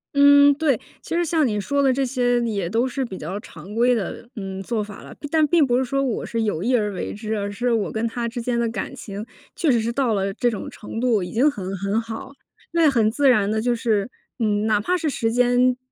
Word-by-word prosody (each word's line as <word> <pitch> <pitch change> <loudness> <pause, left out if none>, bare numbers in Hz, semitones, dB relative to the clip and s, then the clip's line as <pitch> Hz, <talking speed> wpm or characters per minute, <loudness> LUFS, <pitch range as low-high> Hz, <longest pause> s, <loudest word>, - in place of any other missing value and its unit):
嗯， 285 0 +7
对。 285 -5 +1 0.2
其 - - -4
实 345 - +2
像 315 -4 +2
你 210 -2 -1
说 280 +8 0
的 270 -1 +4
这 270 +1 0
些， 245 -1 +1
也 205 -7 -2
都 230 +4 +1
是 265 +1 -2
比 190 -6 -7
较 185 +7 -5
常 190 -1 -11
规 240 +2 +3
的， 220 +2 -4
嗯， 195 -2 -5
做 215 +1 -2
法 205 -1 -10
了， - - -11
并 290 - -8
但 315 -1 +4
并 335 -2 +4
不 245 -2 +2
是 260 - +1
说 275 +2 0
我 255 -4 -2
是 230 - -2
有 205 -7 -1
意 250 +4 +2
而 210 -3 +1
为 185 - -4
之， 215 +1 -4
而 200 0 -2
是 240 +4 -1
我 220 -4 0
跟 220 +1 -2
她 235 +1 -3
之 240 +1 -4
间 235 0 -1
的 235 - +1
感 230 - -4
情， 205 0 -7 0.3
确 320 -6 +2
实 235 - +3
是 225 +1 -1
到 255 -3 +1
了 195 -1 -1
这 240 +3 +1
种 215 - -5
程 225 +1 -7
度， 235 -6 +2
已 180 - -6
经 265 +7 +3
很 195 -6 -5
很 200 +4 0
好。 230 +4 -7 0.4
那 330 -2 +5
很 230 -5 +3
自 275 +4 +3
然 210 -5 +3
地 220 0 0
就 245 +1 +1
是， 225 -2 0 0.3
嗯， 210 -2 +1
哪 215 -2 +2
怕 360 +12 +1
是 315 -3 -1
时 225 -4 -1
间 245 +1 +3
235 Hz, 270 characters per minute, -22 LUFS, 210-260 Hz, 0.4 s, 嗯